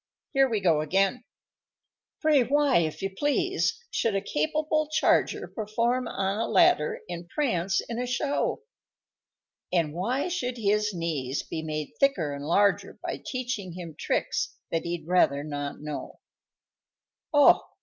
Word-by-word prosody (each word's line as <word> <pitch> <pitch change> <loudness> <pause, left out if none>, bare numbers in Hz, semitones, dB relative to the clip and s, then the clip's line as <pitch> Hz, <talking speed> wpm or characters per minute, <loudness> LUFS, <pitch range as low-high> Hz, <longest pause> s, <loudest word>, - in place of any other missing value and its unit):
"Here 270 -1 +4
we 220 -3 0
go 165 -5 +3
again:" 195 +9 +1 1.0
_Pray 285 -6 +4
why, 285 -4 +4
if 160 +3 -2
you 195 - -1
please, 365 - +1
should 225 -3 0
a - - +3
capable 305 - 0
charger 315 +1 +2
Perform 235 +3 -1
on 195 +2 -1
a 230 - 0
ladder 360 - +3
and 170 +1 -7
prance 195 - 0
in 235 0 -5
a 250 - -2
show? 285 - -1 1.1
And 165 -4 +1
why 235 - -1
should 255 -9 -2
his 210 -1 +1
knees 155 -7 -2
be 160 - -5
made 155 -1 -4
thicker 185 - +2
and 140 +1 -6
larger 200 +4 +2
By - - -4
teaching 245 -8 -4
him 170 -2 -7
tricks - - -1 0.2
that 165 0 -1
he'd 170 -2 -4
rather 145 -6 +3
not 145 -1 -5
know?_ 150 -1 -6 1.1
_Oh! 290 -1 +7
205 Hz, 140 wpm, -27 LUFS, 165-270 Hz, 1.1 s, Oh